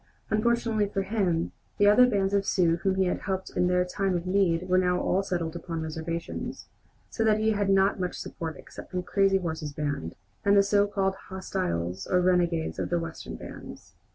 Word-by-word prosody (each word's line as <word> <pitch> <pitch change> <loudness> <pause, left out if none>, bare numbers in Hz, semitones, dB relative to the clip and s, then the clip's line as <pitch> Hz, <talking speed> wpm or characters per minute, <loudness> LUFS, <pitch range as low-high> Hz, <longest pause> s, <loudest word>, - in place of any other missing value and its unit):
Unfortunately 225 -1 +1
for 195 -1 -2
him, 190 -5 0 0.3
the 205 - +4
other 210 +5 +7
bands 200 -4 +1
of 200 -1 +3
Sioux 170 -4 +2
whom 190 +2 0
he 190 - +2
had 180 - -1
helped 190 -1 -3
in 180 - +2
their 180 0 +2
time 190 0 -1
of 170 - -6
need 185 -2 +1
were 185 0 +4
now 180 -1 +2
all 190 - +1
settled 175 -4 -3
upon 165 -1 -4
reservations, 160 +1 -5 0.5
so 225 - -1
that 215 -1 +4
he 220 0 +2
had 205 -2 0
not 195 0 +3
much 180 -1 -2
support 160 -2 -6
except - - -11
from 180 -1 -3
Crazy 195 +1 +3
Horse's 160 -5 -4
band, 145 - -3 0.3
and 200 0 +4
the 200 - +7
so 200 +1 +3
called 195 -1 0 0.2
hostiles 95 - -3
or 180 - +3
renegades 175 -2 +1
of - - -2
the 175 - +1
Western 165 -1 -6
bands. - - -10
185 Hz, 195 wpm, -27 LUFS, 170-200 Hz, 0.5 s, other